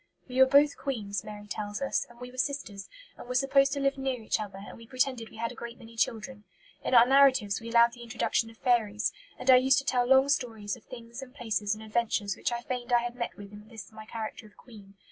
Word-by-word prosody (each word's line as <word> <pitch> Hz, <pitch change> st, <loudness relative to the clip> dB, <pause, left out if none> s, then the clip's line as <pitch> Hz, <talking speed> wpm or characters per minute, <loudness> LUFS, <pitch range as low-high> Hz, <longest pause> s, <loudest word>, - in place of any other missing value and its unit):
"We 255 Hz, 0 st, -3 dB
were 265 Hz, -, +8 dB
both 285 Hz, +2 st, +4 dB
queens," 205 Hz, -8 st, -3 dB
Mary 210 Hz, -1 st, -9 dB
tells 205 Hz, 0 st, -5 dB
us, 275 Hz, 0 st, -1 dB
"and 240 Hz, 0 st, -17 dB
we 250 Hz, 0 st, -8 dB
were 255 Hz, -, -15 dB
sisters, 255 Hz, -8 st, -3 dB, 0.3 s
and -, -, -10 dB
were 250 Hz, -, -4 dB
supposed 275 Hz, +1 st, +3 dB
to 285 Hz, -, -2 dB
live 275 Hz, 0 st, 0 dB
near 265 Hz, -2 st, -2 dB
each 220 Hz, 0 st, -1 dB
other, 200 Hz, -3 st, -6 dB
and -, -, -10 dB
we 230 Hz, -1 st, -14 dB
pretended 255 Hz, -2 st, -1 dB
we -, -, -14 dB
had 230 Hz, +1 st, -2 dB
a -, -, -9 dB
great 235 Hz, 0 st, -8 dB
many 230 Hz, -2 st, -14 dB
children. 225 Hz, 0 st, -2 dB, 0.4 s
In 260 Hz, -, +1 dB
our 235 Hz, 0 st, +9 dB
narratives 260 Hz, -6 st, +4 dB
we 230 Hz, -, -7 dB
allowed 235 Hz, 0 st, +5 dB
the 240 Hz, -, -12 dB
introduction 225 Hz, 0 st, -1 dB
of 225 Hz, -, -16 dB
fairies, 220 Hz, -5 st, +1 dB, 0.2 s
and 265 Hz, -, +3 dB
I 255 Hz, -, +9 dB
used 265 Hz, +1 st, +4 dB
to 275 Hz, -, 0 dB
tell 245 Hz, -3 st, +1 dB
long 265 Hz, +1 st, +5 dB
stories 225 Hz, -7 st, -1 dB
of 245 Hz, -, -19 dB
things 235 Hz, +1 st, -10 dB
and 265 Hz, 0 st, -11 dB
places 215 Hz, -5 st, -1 dB
and 215 Hz, -, -11 dB
adventures 215 Hz, -2 st, -1 dB
which -, -, -2 dB
I 240 Hz, 0 st, -3 dB
feigned 245 Hz, -1 st, -5 dB
I 240 Hz, -1 st, +4 dB
had 240 Hz, 0 st, -4 dB
met 235 Hz, -1 st, -4 dB
with 200 Hz, -1 st, -11 dB
in 210 Hz, +1 st, -12 dB
this 220 Hz, -3 st, -11 dB
my 215 Hz, 0 st, -11 dB
character 220 Hz, -1 st, -6 dB
of 210 Hz, -, -23 dB
queen. 205 Hz, -5 st, -15 dB
235 Hz, 250 wpm, -29 LUFS, 215-260 Hz, 0.4 s, our